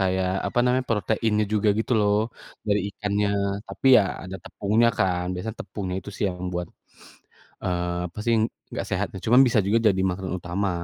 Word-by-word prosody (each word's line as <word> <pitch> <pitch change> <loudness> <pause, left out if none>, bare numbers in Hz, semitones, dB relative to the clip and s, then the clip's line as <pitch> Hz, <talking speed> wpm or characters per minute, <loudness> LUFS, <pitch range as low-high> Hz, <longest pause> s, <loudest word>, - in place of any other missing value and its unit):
kayak 95 -1 +1 0.2
apa - - -2
namanya 125 +1 +1
proteinnya 110 0 +1
juga 105 0 +2
gitu 115 - -1
loh, 105 -1 +3 0.5
dari 105 0 +2
ikannya. 105 -1 0 0.4
Tapi - - -5
ya - - +5 0.2
ada 95 +1 -6
tepungnya 110 +3 +2
kan 90 -3 +1
biasanya 110 +5 -5
tepungnya 95 -3 -4
itu 100 - -8
sih - - -2
yang 90 - -7
membuat 90 -1 -3 1.0
eee 90 -1 -1
pasti 115 +2 +1 0.4
nggak - - -3
sehat, - - 0
nah 95 - -7
cuman 125 +4 +6
bisa 115 -2 +3
juga 105 +4 +3 0.2
jadi 95 - -1
makanan 90 0 -4
utama. 95 +3 -1
100 Hz, 170 wpm, -25 LUFS, 90-110 Hz, 1.0 s, cuman